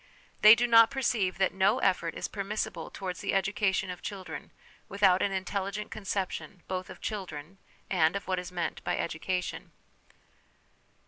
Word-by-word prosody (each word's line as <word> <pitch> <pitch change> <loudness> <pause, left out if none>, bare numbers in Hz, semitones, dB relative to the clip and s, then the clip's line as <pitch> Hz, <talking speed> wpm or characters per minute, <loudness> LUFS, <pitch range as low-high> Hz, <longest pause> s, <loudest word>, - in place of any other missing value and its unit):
They 215 +1 +10
do 240 - +1
not 230 -1 +7
perceive 235 -9 0
that 190 -1 +2
no 190 0 +3
effort 175 -3 +1
is - - -3
permissible 210 +1 -4
towards 185 -2 -5
the - - -1
education 195 -1 +1
of 180 - -8
children 195 -2 -7 0.4
without 195 -2 +4
an 200 - +1
intelligent 200 +2 -3
conception, 195 -2 -4
both 185 0 -4
of - - -11
children, 185 -4 -6 0.3
and 165 -2 +2
of 200 - -4
what 185 -1 0
is 180 0 -7
meant 175 -2 -3
by - - -1
education. 180 +2 -3
190 Hz, 150 wpm, -29 LUFS, 180-200 Hz, 0.4 s, They